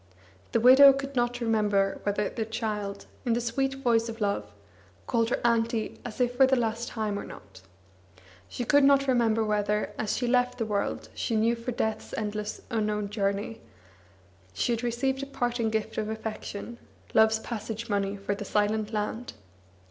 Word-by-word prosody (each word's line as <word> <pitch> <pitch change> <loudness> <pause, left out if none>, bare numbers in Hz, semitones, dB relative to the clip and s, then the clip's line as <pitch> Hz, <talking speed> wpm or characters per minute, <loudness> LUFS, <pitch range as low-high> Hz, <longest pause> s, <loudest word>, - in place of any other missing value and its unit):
The - - +2
widow 265 +4 +9
could 275 0 -5
not 240 0 0
remember 210 -4 +1
whether 205 0 0
the 225 - -3
child, 210 -3 -4 0.2
in 240 - +1
the 235 - +1
sweet 270 +3 -1
voice 235 -4 +1
of 225 0 -7
love, 200 -2 -1 0.5
called 230 -2 +1
her - - 0
"Auntie," 230 -1 +1
as 240 0 -8
if 245 0 +1
for 265 - +7
the 265 - +3
last 235 -1 -1
time, 215 -3 -2
or - - -5
not; 95 -1 -12 0.9
she 245 - -4
could 285 +4 +5
not 275 0 +5
remember 230 -3 +3
whether, 210 0 0
as 215 - -1
she 245 - -1
left 250 0 +2
the 230 - -1
world 205 -2 -2
she 230 - -2
knew 225 +2 +3
for 235 +2 -5
death's 220 -2 -2
endless 210 -1 -3
unknown 210 -2 -1
journey, 200 +1 -2 0.9
she 240 - 0
had 230 -1 0
received 245 +3 -1
a 275 - -5
parting 240 -4 -1
gift 220 -1 -2
of 215 0 -2
affection, 220 +1 -6 0.3
love's 220 0 +5
passage 225 0 -5
money 200 -2 -1
for 200 +1 -2
the 205 +1 -5
silent 210 +1 0
land. 220 +3 -3
225 Hz, 170 wpm, -28 LUFS, 210-245 Hz, 0.9 s, widow